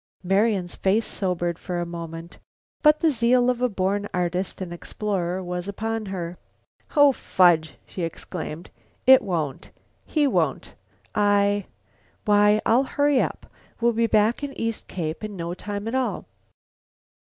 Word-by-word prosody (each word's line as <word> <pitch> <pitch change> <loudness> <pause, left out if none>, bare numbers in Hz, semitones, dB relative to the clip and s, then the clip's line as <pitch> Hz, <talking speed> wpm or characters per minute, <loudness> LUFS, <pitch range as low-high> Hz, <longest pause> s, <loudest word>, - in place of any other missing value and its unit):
Marian's 195 -1 +1
face 205 +4 +1
sobered 175 -3 -2
for 180 -2 -4
a 175 - -1
moment. 170 0 -8 0.4
But 300 0 +5
the 325 -2 +4
zeal 245 0 +3
of 245 -1 -5
a 250 - +2
born 200 0 -1
artist 180 +1 -1
and 180 -2 -5
explorer 185 0 -3
was 180 +1 -4
upon 220 +2 -3
her. 180 -2 -5 0.6
"Oh, 290 -1 +7
fudge!" 175 -9 +3
she 185 - -7
exclaimed, 165 0 -5 0.3
"it 260 +1 +8
won't. 160 -8 -3 0.3
He 300 -2 +1
won't. 275 - 0 0.4
I - - -1
I 205 -1 +3 0.6
why, 210 0 +5
I'll 250 +4 +4
hurry. 285 -1 +2 0.6
We'll 235 0 +2
be 230 +1 +2
back 220 +5 +2
at 280 -1 -5
East 230 -1 -3
Cape 165 +1 -4
in 210 -1 -5
no 170 -1 -4
time 205 +3 -5
at 225 - -3
all." 260 -1 -1
200 Hz, 145 wpm, -24 LUFS, 175-230 Hz, 0.6 s, it